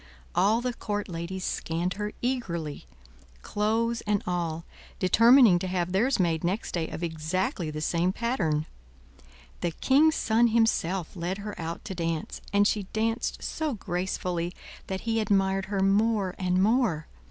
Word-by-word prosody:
All 205 +6 +3
the 250 0 -2
court 205 -3 -3
ladies 175 +2 -5
scanned 170 +2 -2
her 210 +2 -4
eagerly, 170 - -3 0.6
clothes 225 +3 0
and 205 -1 +1
all, 170 -2 -2 0.3
determining 230 +1 +6
to 185 - -3
have 180 -1 -1
theirs 230 +8 +2
made 165 -3 +1
next 185 +6 -1
day 165 -2 -1
of 175 - -6
exactly 165 +1 -2
the 155 0 -5
same 170 +3 +1
pattern. 185 -10 0 0.9
The 175 - 0
king's 285 - +3
son 230 +2 +3
himself 195 -7 +1
led 180 +2 -3
her 205 0 -6
out 165 +1 -5
to 195 - -4
dance, 165 -3 -3
and 205 0 +4
she 205 -3 -1
danced 225 +2 -1
so 310 -5 -2
gracefully 180 -2 -3 0.3
that 190 0 -3
he 225 -1 0
admired 195 -2 +1
her 200 -1 -1
more 200 -1 +2
and 185 0 +2
more. 215 -8 +2
190 Hz, 150 wpm, -27 LUFS, 170-220 Hz, 0.9 s, determining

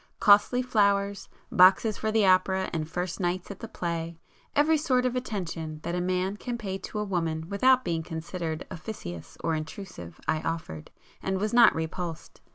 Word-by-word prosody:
Costly 210 +4 +5
flowers, 200 -4 +1 0.2
boxes 195 +2 +6
for 220 - -2
the 215 -2 +3
opera 190 0 +3
and 160 -1 -2
'first 180 +2 -3
nights' 180 +1 -2
at 200 - -9
the 230 - -6
play,—every 170 - -2
sort 255 -4 +2
of 250 0 0
attention 170 -10 -4
that 170 - -3
a 180 - 0
man 185 +2 -1
can 240 +2 -4
pay 195 -4 -4
to 215 - -7
a 210 - 0
woman 165 -5 -2
without 255 +6 +4
being 165 -2 0
considered 160 0 -5
officious 85 - -7
or 165 - +1
intrusive 155 - -7
I 155 0 +1
offered, 160 - -4 0.3
and 190 0 -1
was 215 +3 -1
not 235 -1 +7
repulsed. 160 +1 -5
185 Hz, 165 wpm, -27 LUFS, 165-210 Hz, 0.3 s, not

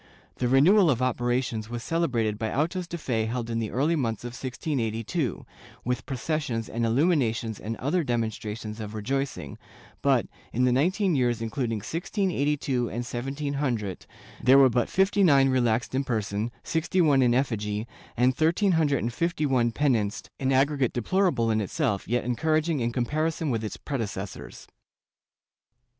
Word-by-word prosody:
The 125 - 0
renewal 165 - +5
of 125 -5 +2
operations 120 -2 -1
was 120 -1 -5
celebrated 115 -11 0
by 110 -1 -2
autos 170 +6 -1
de 170 - -5
fe 115 -8 -1
held 120 0 -3
in 115 - -1
the 110 -2 -2
early 150 +7 +1
months 115 -8 -2
of 120 - -4
1682, 125 - -3 0.4
with 125 -1 -2
processions 130 -4 -2
and 115 +1 -3
illuminations 120 - +1
and 115 +2 -4
other 160 +7 0
demonstrations 110 -3 -3
of 105 0 -6
rejoicing, 135 +6 -3 0.4
but, - - +3 0.3
in 125 - 0
the 125 - +4
nineteen 180 - +2
years 120 -4 +1
including 115 +1 -2
1682 150 - -1
and 120 +2 -4
1700, 135 -4 -3 0.3
there 130 +2 +6
were 135 -2 +6
but 120 +1 +1
fifty 195 +2 +2
nine 140 -6 +5
relaxed 120 -2 +1
in 135 +1 +1
person, 110 -3 -2
sixty 165 +3 -1
one 145 -6 +5
in 120 -1 +3
effigy 105 -5 -1 0.3
and 125 +2 +3
thirteen 170 +5 +2
hundred 150 -5 +2
and 115 +1 -2
fifty 170 +2 -1
one 125 -4 +2
penanced 115 -5 0
— - - -55
an 135 0 0
aggregate 135 -1 +2
deplorable 125 - +1
in 110 0 +1
itself, 100 0 -1
yet 120 +3 0
encouraging 155 +6 0
in 120 -1 0
comparison 155 +5 -1
with 115 -2 -1
its 110 - -5
predecessors. 105 -8 -5
125 Hz, 155 wpm, -26 LUFS, 115-150 Hz, 0.4 s, there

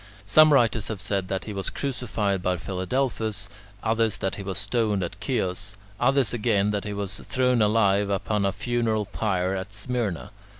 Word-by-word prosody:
Some 155 +9 +7
writers 115 -5 +3
have 110 -3 -4
said 100 -1 -1
that 95 0 -3
he 105 - -5
was 95 -1 -2
crucified 110 -8 -2
by 90 0 0
Philadelphus; 105 - -2 0.4
others 110 -2 +1
that 95 -1 -2
he - - -6
was 95 -2 -4
stoned 110 -5 0
at 90 +2 -4
Chios; 100 -4 -2 0.2
others 135 0 +2
again 105 -3 +2
that 105 -1 -2
he 105 - -3
was 100 -1 -4
thrown 125 -3 +1
alive 105 -2 +3
upon 100 +1 0
a 100 - +2
funeral 110 0 0
pyre 95 -3 -1
at 95 +1 -5
Smyrna. 105 -4 -2
105 Hz, 170 wpm, -25 LUFS, 100-115 Hz, 0.4 s, Some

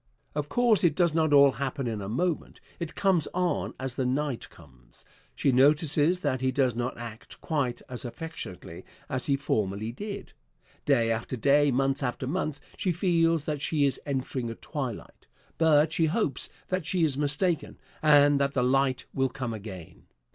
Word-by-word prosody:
Of 150 0 -3
course, 235 +1 +3
it 165 -4 +3
does 170 -3 +2
not 160 -2 +2
all 140 -1 +7
happen 135 0 -3
in 110 -3 -3
a 100 - -5
moment. 170 +8 -2 0.2
It 170 -2 -5
comes 185 -6 +2
on 180 -1 -1
as 130 -1 -3
the 130 - +1
night 135 0 -2
comes. - - -17 0.3
She 135 - +2
notices 150 +5 +3
that 130 -3 -1
he 130 0 +1
does 130 -2 +1
not 120 +2 -3
act 115 -2 -9
quite 130 -6 -2
as 125 0 -5
affectionately 120 - -7 0.3
as 130 -1 -2
he 140 - +3
formerly 105 -5 -1
did. 205 - -7 0.5
Day 120 -5 +3
after 115 +3 -3
day, 145 +4 +4
month 135 +2 +1
after 125 0 -2
month, 155 0 -2 0.2
she 185 - 0
feels 165 -3 +2
that 150 -2 -3
she 145 -1 +1
is 135 - 0
entering 130 -3 -3
a 115 - -5
twilight. 130 -7 -6 0.3
But 160 -1 +4
she 165 - +2
hopes 155 - 0 0.2
that 185 -1 -1
she 175 +2 +1
is 150 -4 +2
mistaken, 150 +4 0 0.2
and 145 -2 +5
that 140 0 +1
the 125 - +1
light 130 0 +1
will 135 -1 +1
come 125 -2 -4
again. 95 -6 -9
140 Hz, 175 wpm, -27 LUFS, 125-160 Hz, 0.5 s, all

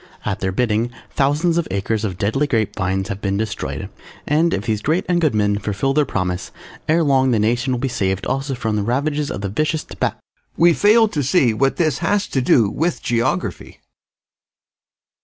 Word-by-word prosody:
At - - -2
their 95 - -1
bidding, 115 +2 0 0.2
thousands 155 +5 +1
of 170 - -2
acres 100 +3 -1
of 95 -4 -3
deadly 110 +10 0
grape 115 -6 0
vines 95 0 -1
have 100 0 -5
been 100 -1 -1
destroyed, 110 0 -3 0.4
and, 160 +3 +2
if 100 - -1
these 110 -2 -1
great 160 - 0
and 175 -1 +1
good 155 -8 +2
men 105 -1 +1
fulfil 105 +7 -1
their 150 0 +3
promise, 90 -1 -2 0.4
ere 165 +2 +4
long 135 -3 +3
the 120 - +2
nation 120 +5 +1
will 125 - 0
be 135 - -1
saved 95 -6 -1
also 135 +1 -2
from 110 -3 -2
the - - 0
ravages 145 +6 -1
of 100 - -4
the 100 - -3
vicious 155 +8 -1
Tobac - - -3 0.4
We 170 0 +5
fail 220 +5 +5
to 150 - -2
see 135 -3 +3
what 135 +5 +1
this 155 -6 0
has 200 +4 +1
to 130 - 0
do 120 -3 +4
with 155 - -2
Geography. 115 -6 -2
125 Hz, 195 wpm, -20 LUFS, 105-150 Hz, 0.4 s, We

